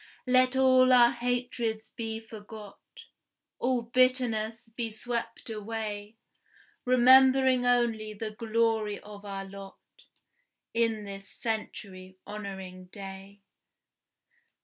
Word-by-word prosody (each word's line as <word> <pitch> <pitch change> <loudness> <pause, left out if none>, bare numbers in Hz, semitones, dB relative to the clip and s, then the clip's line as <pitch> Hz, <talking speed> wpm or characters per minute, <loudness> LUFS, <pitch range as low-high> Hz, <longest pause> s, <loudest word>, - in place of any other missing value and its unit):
Let 255 0 +4
all 255 -1 +5
our 240 -1 +7
hatreds 240 -3 -2
be 225 -1 -4
forgot, 215 -2 -11 0.8
All 250 -1 +1
bitterness 235 -2 +1
be 230 0 -4
swept 230 +1 -5
away, 215 -1 -5 0.7
Remembering 260 0 +6
only 230 -3 +1
the 215 +1 -5
glory 220 -1 0
of 205 -1 -12
our 195 -1 -5
lot 195 0 -10 1.0
In 225 -2 +1
this 195 0 -9
century 190 -4 -5
honoring 190 -3 -7
day! 195 +1 -10
225 Hz, 95 wpm, -29 LUFS, 205-245 Hz, 1.0 s, our